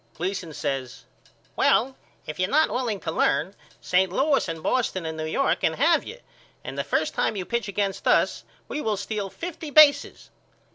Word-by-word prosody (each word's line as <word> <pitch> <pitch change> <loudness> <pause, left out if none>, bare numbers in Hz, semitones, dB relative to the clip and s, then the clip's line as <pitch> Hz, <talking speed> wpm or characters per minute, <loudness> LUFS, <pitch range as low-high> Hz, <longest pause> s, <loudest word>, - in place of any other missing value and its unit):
Gleason 180 -1 -4
says 135 -4 -4 0.5
Well 260 +3 +2 0.3
if 155 - -7
you're 185 +1 +1
not 310 +5 +3
willing 235 -5 -2
to - - -3
learn 190 +3 +1 0.3
St. 185 0 +2
Louis 275 +5 +1
and 165 -1 -6
Boston 205 -8 0
and 160 0 -4
New 155 0 -4
York 270 +12 +1
can - - +1
have - - +3
you 465 - -9 0.5
and - - -7
the - - -2
first - - -1
time - - 0
you 190 -3 -4
pitch 235 0 -2
against 200 -1 -2
us - - +2 0.2
we 300 - -4
will 215 -5 -1
steal 200 0 -4
fifty 330 - -7
bases. 295 -1 +4
200 Hz, 180 wpm, -25 LUFS, 180-265 Hz, 0.5 s, bases